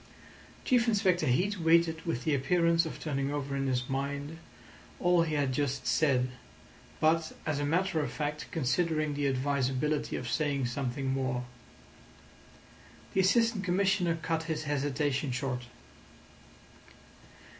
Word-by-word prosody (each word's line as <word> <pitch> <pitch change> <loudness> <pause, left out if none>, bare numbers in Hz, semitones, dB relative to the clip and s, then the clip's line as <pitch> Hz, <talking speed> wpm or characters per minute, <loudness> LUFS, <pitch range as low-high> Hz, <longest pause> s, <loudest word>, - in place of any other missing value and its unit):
Chief 245 -3 +3
Inspector 195 -5 +2
Heat 185 +11 +1
waited 165 0 +3
with 125 -7 -2
the 155 - +1
appearance 170 +4 +2
of - - -7
turning 140 -2 -2
over 140 -1 -3
in 135 0 -1
his 125 -1 0
mind 140 +3 -3 0.6
all 175 -1 +4
he 160 -2 0
had 140 -3 +1
just 140 0 -1
said, 130 -5 +2 0.7
but, 160 0 +2
as 150 -2 -1
a 145 - 0
matter 180 +2 +1
of 150 - -2
fact, 150 0 -3
considering 155 +1 0
the 145 0 0
advisability 140 +2 0
of 125 - -4
saying 140 0 0
something 130 +2 -3
more. 130 -2 -1 1.7
The 190 - +3
Assistant 225 +1 +3
Commissioner 185 -2 +1
cut 165 -1 0
his 155 -1 -2
hesitation 145 -1 -1
short. 125 -1 -3
150 Hz, 130 wpm, -30 LUFS, 135-165 Hz, 1.7 s, all